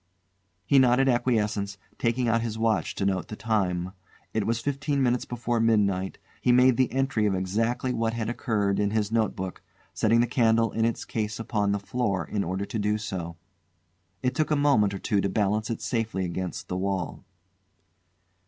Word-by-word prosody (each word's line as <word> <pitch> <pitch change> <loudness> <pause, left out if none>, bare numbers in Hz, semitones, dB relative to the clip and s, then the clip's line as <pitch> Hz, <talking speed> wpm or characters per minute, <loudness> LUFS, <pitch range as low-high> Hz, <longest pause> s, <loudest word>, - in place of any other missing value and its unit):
He 140 - +5
nodded 130 +1 +4
acquiescence, 105 -5 +1 0.2
taking 120 +1 +1
out 115 0 +2
his 115 -1 -3
watch 110 -2 0
to 95 - -1
note 95 -2 0
the 110 - -6
time. 95 -6 -1 0.4
It 110 -2 0
was 115 0 +1
fifteen 140 +1 -1
minutes 125 -1 +1
before 120 -1 -2
midnight; 100 -4 +1 0.2
he 125 - +3
made 125 0 +5
the 130 +1 +2
entry 135 -5 +1
of 100 - +1
exactly 115 +7 -1
what 115 -1 0
had 115 -2 -2
occurred 105 -4 0
in 105 -1 +2
his 105 0 -1
notebook, 105 -5 -1 0.3
setting 115 +2 +3
the 120 - +4
candle 115 -2 +2
in 115 - +1
its 115 - -1
case 110 -1 -3
upon 105 -3 0
the 100 - +1
floor 100 -4 -1
in 100 +3 -2
order 95 +3 -2
to 110 - -4
do 105 +1 +1
so. 85 -5 -5 0.9
It 125 0 +1
took 155 +3 0
a 155 - +3
moment 135 -9 +3
or - - -5
two 100 0 +1
to 100 - 0
balance 105 +2 0
it 115 - -4
safely 110 -6 -1
against 90 +1 -4
the 90 - -3
wall. 95 -3 -2
110 Hz, 180 wpm, -26 LUFS, 100-120 Hz, 0.9 s, He